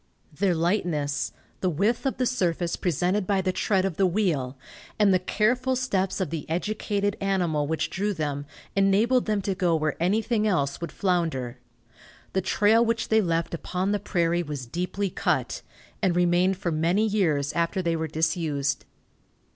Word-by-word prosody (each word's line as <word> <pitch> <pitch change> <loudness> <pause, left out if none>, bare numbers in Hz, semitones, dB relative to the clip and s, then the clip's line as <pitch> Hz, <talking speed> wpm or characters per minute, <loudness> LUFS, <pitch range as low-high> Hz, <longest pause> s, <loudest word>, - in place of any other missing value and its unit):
Their 185 +3 +1
lightness, 165 -5 0 0.3
the 185 - +1
width 210 - +1
of 270 - -2
the 255 - +1
surface 175 -8 0
presented 180 +3 0
by 200 -2 +2
the 185 0 0
tread 190 0 +1
of 190 -5 -3
the 195 - +4
wheel 165 -10 0 0.4
and 205 -2 +4
the 185 - +4
careful 245 +7 +1
steps 200 -8 -1
of 180 -6 -2
the 160 -3 -5
educated 205 +3 -1
animal 175 -7 0
which 160 +1 -1
drew 205 +3 -1
them, 145 -5 -3 0.3
enabled 210 +6 +3
them 210 -2 0
to 195 - 0
go 180 -3 +1
where 155 -1 -1
anything 215 +4 +1
else 140 -8 0
would 170 - -4
flounder. 160 -10 -1 0.7
The 190 - +1
trail 210 +5 +3
which 230 0 -1
they 220 0 +4
left 170 -3 -1
upon 185 +3 -2
the 205 - +1
prairie 175 -3 0
was 145 -5 -5
deeply 180 +8 -2
cut, - - -1 0.4
and 185 -4 +2
remained 180 +2 +3
for 180 -3 -2
many 170 +7 +2
years 160 -9 +1
after 170 +3 0
they 170 -1 +1
were 160 0 -2
disused. 155 -3 -1
180 Hz, 165 wpm, -26 LUFS, 160-205 Hz, 0.7 s, the